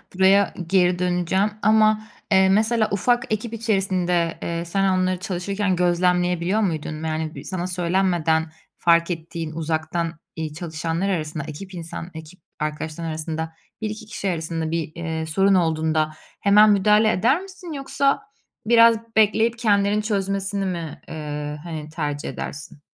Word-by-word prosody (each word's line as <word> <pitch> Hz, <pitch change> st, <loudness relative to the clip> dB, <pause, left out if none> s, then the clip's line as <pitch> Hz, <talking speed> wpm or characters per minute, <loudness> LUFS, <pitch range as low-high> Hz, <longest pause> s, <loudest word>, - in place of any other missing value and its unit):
Buraya 195 Hz, +1 st, +4 dB
geri 180 Hz, -1 st, +3 dB
döneceğim 180 Hz, +3 st, +1 dB
ama, 215 Hz, 0 st, +4 dB, 0.3 s
eee, 190 Hz, 0 st, +5 dB
mesela 215 Hz, +2 st, +3 dB
ufak 235 Hz, +3 st, +1 dB
ekip 220 Hz, +2 st, -3 dB
içerisinde, 185 Hz, -6 st, 0 dB
eee, 170 Hz, 0 st, -3 dB
sen 195 Hz, +2 st, +1 dB
onları 185 Hz, 0 st, 0 dB
çalışırken 190 Hz, +1 st, -1 dB
gözlemleyebiliyor 180 Hz, +2 st, +2 dB
muydun? 155 Hz, -4 st, -2 dB
Yani, 160 Hz, 0 st, -3 dB
sana 185 Hz, -2 st, -3 dB
söylenmeden 175 Hz, -3 st, +1 dB, 0.3 s
fark 170 Hz, +1 st, +3 dB
ettiğin, 165 Hz, -1 st, -5 dB
uzaktan, 160 Hz, 0 st, -2 dB, 0.2 s
iii, 160 Hz, -2 st, -4 dB
çalışanlar 165 Hz, +3 st, -3 dB
arasında, 155 Hz, -4 st, -2 dB
ekip 175 Hz, +6 st, -8 dB
insan 170 Hz, 0 st, -7 dB
ekip 160 Hz, +3 st, -11 dB, 0.2 s
arkadaşların 155 Hz, +2 st, -3 dB
arasında 160 Hz, +1 st, -4 dB, 0.3 s
1-2 215 Hz, +1 st, -4 dB
kişi 205 Hz, -2 st, -3 dB
arasında 165 Hz, -1 st, -2 dB
bir, 165 Hz, -2 st, -2 dB
eee, 160 Hz, -1 st, -3 dB
sorun 195 Hz, +5 st, +3 dB
olduğunda 160 Hz, -2 st, +1 dB, 0.3 s
hemen 210 Hz, +2 st, +6 dB
müdahale 210 Hz, +2 st, +4 dB
eder 245 Hz, -, +2 dB
misin 375 Hz, -3 st, -10 dB
yoksa 275 Hz, 0 st, +1 dB, 0.5 s
biraz 230 Hz, 0 st, +6 dB, 0.2 s
bekleyip 220 Hz, +2 st, +3 dB
kendilerinin 205 Hz, -2 st, +2 dB
çözmesini 195 Hz, -1 st, -1 dB
mi, 170 Hz, -4 st, -4 dB
eee, 150 Hz, -1 st, -5 dB
hani, 155 Hz, -3 st, -6 dB
tercih 150 Hz, -2 st, -3 dB
edersin? 145 Hz, 0 st, -7 dB
180 Hz, 130 wpm, -23 LUFS, 160-200 Hz, 0.5 s, hemen